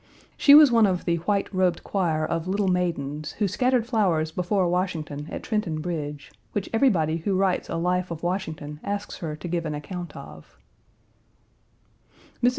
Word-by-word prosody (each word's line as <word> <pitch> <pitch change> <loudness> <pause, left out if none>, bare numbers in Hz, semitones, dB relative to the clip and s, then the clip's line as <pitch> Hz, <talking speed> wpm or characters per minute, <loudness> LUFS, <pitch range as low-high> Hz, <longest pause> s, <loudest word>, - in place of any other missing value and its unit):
She 285 - +7
was 300 -3 +9
one 230 -3 +5
of 180 -2 -1
the 170 -1 +1
"white 200 0 0
robed 185 -2 +1
choir" 165 -6 0
of 165 +2 -2
little 200 +1 0
maidens 155 -5 -1
who 210 - 0
scattered 250 +4 +1
flowers 185 -10 +1
before 180 +2 0
Washington 165 -5 -2
at - - -6
Trenton 210 -8 -1
Bridge, 150 -4 -5 0.2
which 205 -1 -3
everybody 180 - +2
who 185 +3 -1
writes 190 -1 +1
a - - -3
life 180 +2 0
of 170 -1 -6
Washington 160 -5 -3
asks 205 0 -4
her 155 -4 -4
to 165 - -7
give 170 0 -1
an 150 - -3
account 175 +4 -7
of. - - -12 1.8
Mrs. 245 - +5
180 Hz, 165 wpm, -25 LUFS, 160-200 Hz, 1.8 s, was